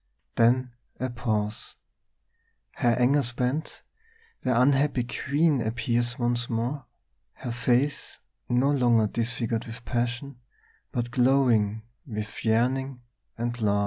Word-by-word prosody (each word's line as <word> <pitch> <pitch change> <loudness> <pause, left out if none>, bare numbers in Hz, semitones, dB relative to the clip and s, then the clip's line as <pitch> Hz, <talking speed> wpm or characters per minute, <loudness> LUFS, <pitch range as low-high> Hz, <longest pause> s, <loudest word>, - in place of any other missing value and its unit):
Then 125 +2 +3 0.3
a 130 0 -2
pause; 110 -3 -2 1.0
her 120 -3 +1
anger 135 +4 +4
spent, 125 +4 -2 0.6
the 125 -2 +2
unhappy 135 0 +3
queen 140 +3 +1
appears 120 +2 -1
once 120 0 0
more, 120 +4 -2 0.5
her 120 - -6
face 125 +4 0 0.3
no 125 +4 +3
longer 120 -5 +3
disfigured 115 +1 -2
with 115 +1 -9
passion, 120 +2 -2 0.5
but 120 0 -2
glowing 120 -5 +3 0.2
with 105 -3 -6
yearning 125 +3 0 0.3
and 120 0 -3
love. 100 -1 +2
120 Hz, 110 wpm, -27 LUFS, 115-130 Hz, 1.0 s, anger